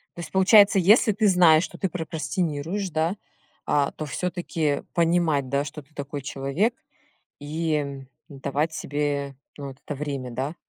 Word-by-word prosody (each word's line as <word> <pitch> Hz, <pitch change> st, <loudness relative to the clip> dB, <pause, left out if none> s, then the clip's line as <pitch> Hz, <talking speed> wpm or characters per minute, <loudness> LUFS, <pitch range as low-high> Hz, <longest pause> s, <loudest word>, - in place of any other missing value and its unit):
То -, -, -11 dB
есть -, -, -8 dB
получается, 195 Hz, +1 st, +6 dB
если 215 Hz, +5 st, +5 dB
ты 210 Hz, +1 st, +2 dB
знаешь, 175 Hz, -4 st, +6 dB
что -, -, -7 dB
ты 190 Hz, -, -1 dB
прокрастинируешь, 165 Hz, +2 st, -3 dB
да, 160 Hz, +3 st, 0 dB, 0.5 s
а, 145 Hz, -1 st, +1 dB
то 155 Hz, -, -6 dB
всё-таки 165 Hz, -3 st, -2 dB
понимать, 165 Hz, -5 st, +2 dB
да, 140 Hz, +2 st, +1 dB
что 150 Hz, +2 st, -8 dB
ты 145 Hz, +2 st, -27 dB
такой 145 Hz, 0 st, -5 dB
человек 140 Hz, -, -1 dB, 0.7 s
и, 155 Hz, +2 st, -2 dB
м, 140 Hz, -2 st, -4 dB, 0.2 s
давать 140 Hz, +3 st, -2 dB
себе, 145 Hz, -2 st, -2 dB, 0.2 s
ну, 140 Hz, -1 st, -6 dB
вот 135 Hz, -, -12 dB
это 145 Hz, -, -4 dB
время, 140 Hz, -3 st, -4 dB
да? 135 Hz, +6 st, -3 dB
155 Hz, 155 wpm, -25 LUFS, 140-175 Hz, 0.7 s, получается